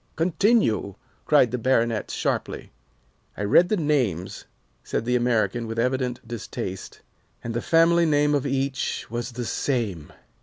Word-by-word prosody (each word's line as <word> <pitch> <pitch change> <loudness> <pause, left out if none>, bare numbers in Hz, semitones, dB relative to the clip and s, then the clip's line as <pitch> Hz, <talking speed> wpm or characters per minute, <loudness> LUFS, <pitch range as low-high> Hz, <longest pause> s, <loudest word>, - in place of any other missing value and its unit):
"Continue!" 165 - +1 0.3
cried 140 -6 +4
the 125 - -2
Baronet, 115 -3 +1
sharply. - - -3 0.7
"I 105 - -3
read 170 - +4
the 215 - +1
names," 125 - -1 0.4
said - - -3
the 125 +1 +1
American 120 -2 0
with 115 0 -5
evident 125 0 -1
distaste, 100 -4 -6 0.4
"and 115 - -4
the 120 - -2
family 170 +1 +4
name 150 -1 +2
of 140 -1 0
each 135 -1 -2
was 120 +1 -4
the 120 0 -4
same. 110 - -2
125 Hz, 140 wpm, -24 LUFS, 115-145 Hz, 0.7 s, cried